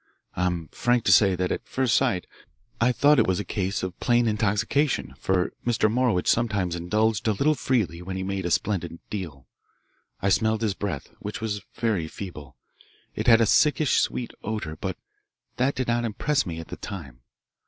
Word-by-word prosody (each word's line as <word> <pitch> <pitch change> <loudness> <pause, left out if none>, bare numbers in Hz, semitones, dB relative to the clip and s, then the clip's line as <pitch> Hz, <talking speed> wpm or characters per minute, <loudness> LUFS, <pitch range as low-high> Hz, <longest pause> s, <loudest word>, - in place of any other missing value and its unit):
I'm 90 -2 -1
frank 120 -1 +1
to - - +3
say 95 0 +6
that 90 0 -1
at - - -2
first 130 -4 0
sight 90 -3 +1 0.5
I 120 +2 +4
thought 145 +3 +4
it 115 - +3
was 95 -1 +1
a 105 - -3
case 95 +1 -2
of 90 -1 -5
plain 120 -1 +3
intoxication, 110 - 0
for 90 0 0
Mr. 115 -3 +2
Morowitch 120 -7 +1
sometimes 100 -7 +1
indulged 105 +6 0
a 110 - +3
little 145 +10 +2
freely 115 - 0
when 95 +1 -5
he 95 - -3
made 95 -1 -2
a - - -2
splendid 85 -3 -1
deal. 80 -10 -6 0.7
I 100 - +1
smelled 110 +3 +2
his 105 -3 +1
breath, 95 -8 -4
which 105 +1 -5
was 105 -2 -3
very 105 -9 0
feeble. 80 -6 -9 0.6
It - - -4
had 115 -1 +7
a - - +5
sickish 150 +4 +3
sweet 120 - -2
odour, 105 -7 -3
but 95 +2 -4 0.6
that 130 +3 +1
did 130 - -2
not 120 0 +1
impress 120 +4 0
me 80 -1 -4
at 80 - -9
the - - -6
time. 75 -11 -8
105 Hz, 185 wpm, -25 LUFS, 90-115 Hz, 0.7 s, had